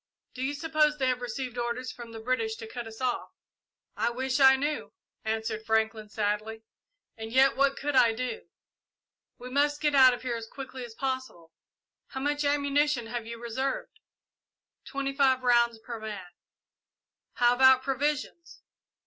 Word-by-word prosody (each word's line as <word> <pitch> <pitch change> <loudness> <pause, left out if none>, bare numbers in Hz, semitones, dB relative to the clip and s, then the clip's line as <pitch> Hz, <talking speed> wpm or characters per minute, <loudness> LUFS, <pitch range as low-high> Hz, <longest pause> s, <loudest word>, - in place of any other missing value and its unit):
Do 255 - -7
you 275 +2 -1
suppose 305 0 +1
they 260 -2 +1
have 250 -1 -1
received 245 +1 -4
orders 240 +2 -3
from 235 -1 -10
the 225 - -8
British 225 -1 -1
to 225 0 -8
cut 235 +1 -7
us 225 +2 -11
off?" 250 -2 -1 0.7
"I - - +1
wish 260 +3 -1
I 265 -1 +8
knew," 290 +3 -3 0.3
answered 220 0 -2
Franklin, 220 -1 0
sadly; 215 +1 -2 0.5
"and 220 0 -7
yet 265 +2 +5
what 275 0 +2
could 290 0 -2
I 235 -3 +6
do?" 255 - -5 0.9
"We 250 +1 -9
must 290 +2 +2
get 295 -1 +1
out 260 -2 +7
of - - -12
here 250 -2 -2
as 230 -1 -6
quickly 260 0 -8
as 235 -2 -10
possible. 260 -12 -4 0.6
How 265 - -6
much 290 +2 0
ammunition 285 -2 +1
have 235 -2 -4
you 235 0 -6
reserved?" 260 - -3 0.9
"Twenty 275 -1 -3
five 265 -2 +3
rounds 235 -2 +3
per 225 +1 -8
man." 210 -4 -7 1.0
"How 240 0 +4
about 260 +1 +6
provisions?" 290 +5 -3
255 Hz, 160 wpm, -28 LUFS, 225-275 Hz, 1.0 s, I